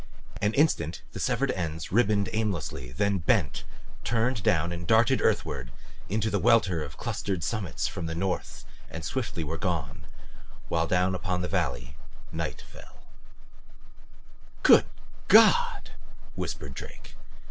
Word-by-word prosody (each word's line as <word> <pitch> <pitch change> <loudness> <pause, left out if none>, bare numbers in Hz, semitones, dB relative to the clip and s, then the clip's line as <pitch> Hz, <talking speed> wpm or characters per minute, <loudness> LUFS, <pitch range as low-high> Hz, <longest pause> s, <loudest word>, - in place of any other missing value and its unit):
An 105 +2 +1
instant 135 - +1
the - - -7
severed - - +1
ends 80 -3 -4
ribboned 105 -2 +3
aimlessly, 90 - -2
then 100 +8 0
bent, 80 - +1 0.4
turned 115 0 0
down 85 -1 +2
and 85 -1 -6
darted 115 +6 +4
earthward 75 - 0 0.4
into 110 +2 0
the 100 - +1
welter 100 -8 +3
of 75 -3 -7
clustered 95 -5 -3
summits 110 -3 -2
at 85 -2 -4
the 80 - -4
north 95 +2 -3 0.2
and 80 0 -6
swiftly 120 -10 -3
were 80 +2 -4
gone, 80 -4 -3 0.6
while 80 0 +1
down 90 +1 +2
upon 90 -1 -2
the - - -1
valley 70 -8 -2
fell - - -19
night. - - -4 2.0
"Good - - +7 0.4
God!" - - +5 0.4
whispered 70 -3 -5
Drake. - - -10
90 Hz, 130 wpm, -27 LUFS, 80-105 Hz, 2.0 s, Good